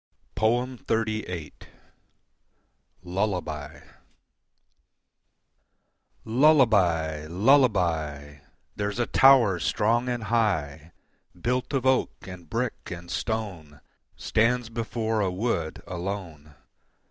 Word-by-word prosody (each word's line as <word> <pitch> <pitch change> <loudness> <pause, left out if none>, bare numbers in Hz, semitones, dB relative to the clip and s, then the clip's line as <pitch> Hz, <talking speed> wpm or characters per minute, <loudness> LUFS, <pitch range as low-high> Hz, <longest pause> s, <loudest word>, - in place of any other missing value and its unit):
XXXVIII. 110 -7 -1 1.5
Lullaby 90 -6 -3 2.4
Lullaby! 105 - +3
Lullaby! 85 - +2 0.4
There's 105 +1 -3
a 120 - +1
tower 125 -10 +5
strong 115 +6 +1
and 120 -2 -3
high 85 -10 -1 0.5
Built 125 +6 -1
of 135 -2 0
oak 130 0 +2
and 90 -4 -10
brick 115 0 -3
and 85 -1 -8
stone, 95 -7 -4 0.4
Stands 115 +1 +1
before 115 -1 -2
a 95 - +1
wood 90 -5 -2
alone. 85 -5 -6
105 Hz, 75 wpm, -26 LUFS, 85-120 Hz, 2.4 s, tower